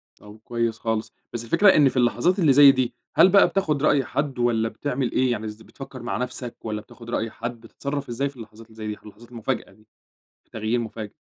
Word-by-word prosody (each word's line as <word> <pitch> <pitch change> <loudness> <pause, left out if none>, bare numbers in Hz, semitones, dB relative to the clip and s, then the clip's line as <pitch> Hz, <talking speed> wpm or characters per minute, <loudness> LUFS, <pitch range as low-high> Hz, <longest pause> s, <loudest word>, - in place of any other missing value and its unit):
طب 105 +1 -14
كويس 115 -2 -2
خالص، 110 -1 -2 0.2
بس 120 -1 -3
الفكرة 200 - +4
إن 145 -3 +6
في 130 - -6
اللحظات 125 - +2
اللي 155 -7 +5
زي 140 0 +9
دي، 130 -3 -1 0.2
هل 185 - +7
بقى 200 +1 +6
بتاخد 155 -7 -1
رأي 140 -3 +3
حد 140 -2 -3
والّا 115 -2 +1
بتعمل 135 0 -3
إيه؟ 130 -1 +2
يعني 110 -2 -3
إز 105 0 -7
بتفكّر 130 +2 -10
مع - - -2
نفْسك 125 -1 -5
والّا 105 -1 -3
بتاخد 115 +2 -14
رأي 115 -1 -2
حد، 120 0 -6
بتتصرّف 140 +2 -5
إزاي 135 +4 -1
في 140 - -17
اللحظات 110 0 -12
اللي 110 - -19
زي 110 -1 -6
دي؟ 105 - -4
ح - - -24
لحظات 110 +3 -14
مفاجأة 120 +2 -3
دي، 110 0 -24 0.6
تغيير 110 +2 -1
مفاجئ. 110 -2 -6
120 Hz, 220 wpm, -24 LUFS, 110-135 Hz, 0.6 s, زي